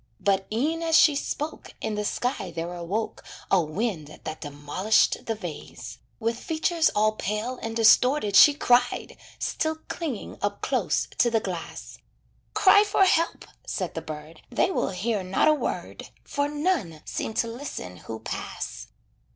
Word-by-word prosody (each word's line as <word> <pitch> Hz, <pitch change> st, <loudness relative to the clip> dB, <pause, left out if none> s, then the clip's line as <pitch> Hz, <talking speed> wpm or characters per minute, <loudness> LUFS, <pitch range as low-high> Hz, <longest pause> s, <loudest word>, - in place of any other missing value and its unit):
But 195 Hz, -1 st, +1 dB
e'en 305 Hz, +9 st, 0 dB
as 325 Hz, -1 st, +4 dB
she 300 Hz, -, +6 dB
spoke 300 Hz, +2 st, -4 dB
In 220 Hz, -, -2 dB
the 210 Hz, 0 st, -2 dB
sky 225 Hz, -2 st, -2 dB
there 170 Hz, +1 st, -4 dB
awoke 180 Hz, +6 st, -3 dB, 0.3 s
A 190 Hz, -, +5 dB
wind 160 Hz, -2 st, -3 dB
that 155 Hz, -, -6 dB
demolished 145 Hz, +8 st, +1 dB
the 225 Hz, -, 0 dB
vase. 145 Hz, -, -8 dB, 0.2 s
With 230 Hz, +1 st, -1 dB
features 325 Hz, +1 st, +1 dB
all 215 Hz, +1 st, +4 dB
pale 215 Hz, +4 st, -3 dB
and 225 Hz, 0 st, -4 dB
distorted 225 Hz, 0 st, +4 dB
she 290 Hz, +7 st, +9 dB
cried, 245 Hz, -3 st, +2 dB, 0.2 s
Still 315 Hz, 0 st, -1 dB
clinging 295 Hz, -, -5 dB
up -, -, -2 dB
close -, -, +1 dB
to 240 Hz, -, +5 dB
the 225 Hz, -1 st, +2 dB
glass. 180 Hz, -5 st, -6 dB, 0.6 s
"Cry 410 Hz, +1 st, +7 dB
for 410 Hz, -1 st, +3 dB
help." 335 Hz, -2 st, +1 dB, 0.2 s
Said 185 Hz, -4 st, -3 dB
the 165 Hz, -, -4 dB
bird, 155 Hz, 0 st, -9 dB
"They 255 Hz, +9 st, +1 dB
will -, -, 0 dB
hear 200 Hz, +3 st, -1 dB
not 185 Hz, +9 st, +1 dB
a 310 Hz, -, +7 dB
word, 300 Hz, -, -4 dB
For 285 Hz, 0 st, -1 dB
none 290 Hz, -, -1 dB
seem 220 Hz, -, -4 dB
to 230 Hz, -, +1 dB
listen 230 Hz, -, -6 dB
who 110 Hz, +5 st, -8 dB
pass." -, -, -5 dB
220 Hz, 155 wpm, -26 LUFS, 175-285 Hz, 0.6 s, she